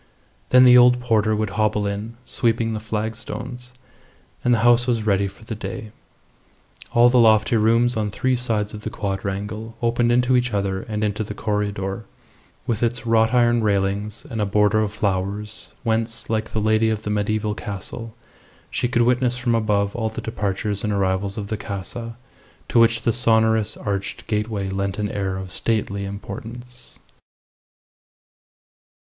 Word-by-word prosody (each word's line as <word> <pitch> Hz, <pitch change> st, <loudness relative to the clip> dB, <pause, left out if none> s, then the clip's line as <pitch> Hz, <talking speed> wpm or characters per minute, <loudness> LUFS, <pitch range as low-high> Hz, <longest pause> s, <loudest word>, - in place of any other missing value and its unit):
Then 125 Hz, 0 st, +7 dB
the 125 Hz, -1 st, +8 dB
old 125 Hz, 0 st, +6 dB
porter 110 Hz, -3 st, +2 dB
would 105 Hz, -2 st, -1 dB
hobble 105 Hz, -1 st, +1 dB
in, 105 Hz, +3 st, -4 dB
sweeping 115 Hz, -1 st, 0 dB
the 110 Hz, -, -3 dB
flagstones, 115 Hz, +3 st, -5 dB, 0.7 s
and 125 Hz, -, +2 dB
the 115 Hz, -2 st, +3 dB
house 120 Hz, 0 st, +5 dB
was 115 Hz, -3 st, 0 dB
ready 100 Hz, -1 st, +2 dB
for 100 Hz, +3 st, -13 dB
the 110 Hz, -, -5 dB
day. 110 Hz, 0 st, -6 dB, 1.0 s
All 120 Hz, +1 st, +6 dB
the 125 Hz, 0 st, +4 dB
lofty 110 Hz, 0 st, +5 dB
rooms 115 Hz, +2 st, +3 dB
on 105 Hz, -1 st, -1 dB
three 130 Hz, +5 st, 0 dB
sides 110 Hz, -4 st, -1 dB
of 105 Hz, -, -7 dB
the 110 Hz, -, -4 dB
quadrangle 105 Hz, +2 st, -4 dB
opened 120 Hz, 0 st, +1 dB
into 125 Hz, +1 st, +3 dB
each 125 Hz, -3 st, +1 dB
other 95 Hz, -1 st, -1 dB
and 105 Hz, -1 st, -4 dB
into 105 Hz, +1 st, -1 dB
the 105 Hz, 0 st, -7 dB
corredor, 105 Hz, -1 st, -2 dB, 0.6 s
with 115 Hz, -3 st, -1 dB
its 120 Hz, +1 st, 0 dB
wrought 110 Hz, -1 st, +3 dB
iron 120 Hz, -1 st, +3 dB
railings 100 Hz, +2 st, -1 dB
and 115 Hz, -6 st, -3 dB
a -, -, +2 dB
border 105 Hz, +1 st, +3 dB
of 105 Hz, -1 st, 0 dB
flowers, 105 Hz, +1 st, -3 dB
whence, 115 Hz, -1 st, -1 dB
like 110 Hz, 0 st, -1 dB
the 110 Hz, -, -1 dB
lady 110 Hz, +1 st, +3 dB
of 110 Hz, -1 st, -2 dB
the 105 Hz, -, -2 dB
mediaeval 105 Hz, +1 st, 0 dB
castle, 105 Hz, +3 st, -6 dB, 0.6 s
she -, -, 0 dB
could 120 Hz, 0 st, +2 dB
witness 125 Hz, 0 st, +2 dB
from 120 Hz, -1 st, 0 dB
above 105 Hz, -3 st, +1 dB
all 110 Hz, -2 st, -1 dB
the 110 Hz, -, -7 dB
departures 100 Hz, -2 st, -2 dB
and 105 Hz, -, 0 dB
arrivals 100 Hz, 0 st, 0 dB
of 100 Hz, -1 st, -5 dB
the 110 Hz, -, -2 dB
Casa, 115 Hz, +4 st, -6 dB, 0.5 s
to 120 Hz, -, +3 dB
which 115 Hz, 0 st, +4 dB
the 115 Hz, -, +2 dB
sonorous 110 Hz, -2 st, +2 dB
arched 100 Hz, -1 st, -4 dB
gateway 105 Hz, -2 st, -2 dB
lent 95 Hz, 0 st, -2 dB
an 105 Hz, -1 st, -2 dB
air 95 Hz, -2 st, -2 dB
of 95 Hz, -1 st, -6 dB
stately 100 Hz, -3 st, -1 dB
importance. 120 Hz, +5 st, -8 dB
110 Hz, 165 wpm, -22 LUFS, 100-115 Hz, 1.0 s, the